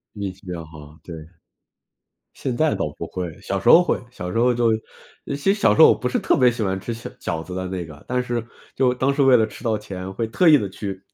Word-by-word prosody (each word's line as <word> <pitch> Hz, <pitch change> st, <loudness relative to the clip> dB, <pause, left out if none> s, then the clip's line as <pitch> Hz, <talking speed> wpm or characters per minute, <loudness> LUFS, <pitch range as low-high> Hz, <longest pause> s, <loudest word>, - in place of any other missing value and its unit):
运 100 Hz, -2 st, -4 dB
气 95 Hz, -, -21 dB
比 90 Hz, -, -5 dB
较 85 Hz, -2 st, -6 dB
好， 75 Hz, 0 st, -14 dB
对。 85 Hz, -, -9 dB, 1.2 s
现 125 Hz, -3 st, -4 dB
在 155 Hz, +2 st, +2 dB
倒 -, -, -2 dB
不 -, -, -5 dB
会， 90 Hz, -3 st, -5 dB
小 -, -, -3 dB
时 -, -, -1 dB
候 175 Hz, -, +9 dB
会， -, -, -1 dB
小 90 Hz, -4 st, -6 dB
时 115 Hz, -, -2 dB
候 125 Hz, +1 st, +3 dB
就 115 Hz, -1 st, +2 dB, 0.5 s
其 140 Hz, -, -3 dB
实 195 Hz, +8 st, +2 dB
小 210 Hz, -, +3 dB
时 -, -, 0 dB
候 -, -, +10 dB
我 -, -, +5 dB
不 125 Hz, -, -3 dB
是 -, -, -1 dB
特 -, -, +2 dB
别 125 Hz, -1 st, +5 dB
喜 115 Hz, -2 st, -4 dB
欢 95 Hz, -1 st, -1 dB
吃 115 Hz, +4 st, -5 dB
小 115 Hz, +2 st, -8 dB
饺 80 Hz, -1 st, -3 dB
子 90 Hz, -, -10 dB
的 95 Hz, 0 st, -3 dB
那 90 Hz, -2 st, -4 dB
个， 75 Hz, -2 st, -13 dB
但 125 Hz, 0 st, 0 dB
是 120 Hz, -2 st, -3 dB, 0.3 s
就 125 Hz, -1 st, +2 dB
当 135 Hz, +2 st, +1 dB
时 140 Hz, 0 st, +1 dB
为 130 Hz, -2 st, +6 dB
了 110 Hz, -, +3 dB
吃 110 Hz, +3 st, -13 dB
到 110 Hz, -2 st, +1 dB
钱 95 Hz, -1 st, -7 dB
会 115 Hz, -, -2 dB
特 170 Hz, +9 st, +3 dB
意 150 Hz, -, +8 dB
地 105 Hz, -7 st, -1 dB
去 95 Hz, -1 st, -6 dB
110 Hz, 285 characters per minute, -22 LUFS, 90-125 Hz, 1.2 s, 候